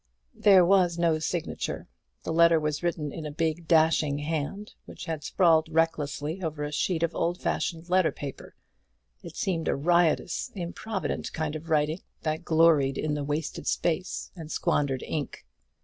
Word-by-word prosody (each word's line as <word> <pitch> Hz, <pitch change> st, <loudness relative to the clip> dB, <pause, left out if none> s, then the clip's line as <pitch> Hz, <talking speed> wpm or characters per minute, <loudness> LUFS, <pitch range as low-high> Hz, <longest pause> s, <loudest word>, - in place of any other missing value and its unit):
There 190 Hz, -3 st, +6 dB
was 180 Hz, -2 st, +3 dB
no 165 Hz, -2 st, +2 dB
signature. 165 Hz, +1 st, -3 dB, 0.4 s
The 160 Hz, -, -3 dB
letter 170 Hz, 0 st, +5 dB
was 150 Hz, -1 st, -2 dB
written 170 Hz, -4 st, -2 dB
in 155 Hz, 0 st, -6 dB
a -, -, -6 dB
big 160 Hz, +2 st, -2 dB
dashing 160 Hz, -3 st, +3 dB
hand, 160 Hz, +7 st, -4 dB
which -, -, -9 dB
had 160 Hz, -3 st, -4 dB
sprawled 160 Hz, -2 st, +3 dB
recklessly 160 Hz, 0 st, -1 dB
over 155 Hz, -3 st, -3 dB
a 150 Hz, -, -3 dB
sheet 165 Hz, +2 st, 0 dB
of 170 Hz, -, 0 dB
old 175 Hz, +2 st, -1 dB
fashioned 165 Hz, -1 st, -2 dB
letter 185 Hz, -1 st, +3 dB
paper; 140 Hz, -2 st, -8 dB, 0.7 s
it -, -, -10 dB
seemed 165 Hz, -4 st, -1 dB
a -, -, +2 dB
riotous, 170 Hz, +2 st, +1 dB
improvident 195 Hz, +3 st, -4 dB
kind 155 Hz, -1 st, -2 dB
of 160 Hz, +2 st, -7 dB
writing, 155 Hz, +2 st, +1 dB, 0.2 s
that 155 Hz, +1 st, -2 dB
gloried 160 Hz, -5 st, +4 dB
in 155 Hz, -1 st, -1 dB
the 145 Hz, -1 st, -2 dB
wasted 150 Hz, +2 st, -3 dB
space 175 Hz, +2 st, -1 dB
and 160 Hz, -3 st, -8 dB
squandered 135 Hz, -3 st, 0 dB
ink. 150 Hz, -3 st, -5 dB
160 Hz, 160 wpm, -27 LUFS, 150-170 Hz, 0.7 s, There